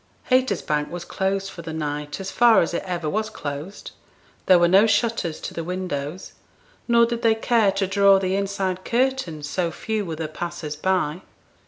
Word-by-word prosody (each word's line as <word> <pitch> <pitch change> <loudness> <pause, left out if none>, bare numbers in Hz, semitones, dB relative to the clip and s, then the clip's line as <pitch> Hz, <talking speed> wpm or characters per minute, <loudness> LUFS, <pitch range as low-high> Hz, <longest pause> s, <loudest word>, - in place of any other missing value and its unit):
Haytersbank 200 -12 +1
was 175 0 -6
closed 195 0 -2
for 170 - -9
the 165 -1 -7
night 150 0 -4
as 195 0 -5
far 235 -2 +5
as 170 - -4
it - - -1
ever 175 -3 -3
was 215 +7 -1
closed; 150 +3 -7 0.6
there 185 - +7
were 175 0 +4
no 195 +5 +5
shutters 210 -6 0
to - - -6
the 165 - -4
windows, 180 -2 -4 0.5
nor 235 -1 +5
did 235 0 -3
they 225 -1 +4
care 225 -2 +2
to 195 0 0
draw 195 0 +5
the 190 0 0
inside 195 -2 -2
curtains, 235 - -1
so 175 +2 -1
few 215 +6 -3
were 165 -4 -5
the 160 0 -4
passers 160 -1 -5
by. 180 0 0
185 Hz, 180 wpm, -23 LUFS, 165-205 Hz, 0.6 s, there